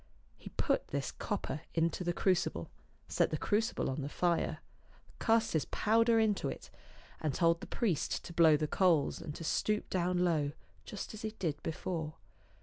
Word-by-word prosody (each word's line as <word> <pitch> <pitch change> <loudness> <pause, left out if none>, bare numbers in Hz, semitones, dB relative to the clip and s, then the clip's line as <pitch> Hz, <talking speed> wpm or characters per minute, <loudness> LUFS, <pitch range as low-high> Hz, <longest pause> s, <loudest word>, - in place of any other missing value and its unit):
He - - -11
put - - +1
this - - -2
copper 150 - -3
into 165 +2 +1
the 175 - +1
crucible, 185 +1 0 0.4
set - - +2
the - - -1
crucible 220 +3 0
on 135 +3 -2
the 140 - -4
fire, 170 -1 0 0.6
cast 225 0 +2
his 155 - +1
powder 230 +1 +3
into 215 -3 +1
it, - - -8 0.5
and 150 -4 -1
told 170 0 +3
the - - -7
priest 200 - -1
to 170 - -8
blow 160 -2 +6
the 155 - 0
coals, 165 -3 +2
and 150 - -6
to - - -7
stoop 210 +6 0
down 180 0 +1
low, 150 -4 +1 0.3
just 210 - -6
as 215 - -8
he 220 0 -4
did 155 -6 -2
before. 160 -1 -3
170 Hz, 170 wpm, -33 LUFS, 155-210 Hz, 0.6 s, blow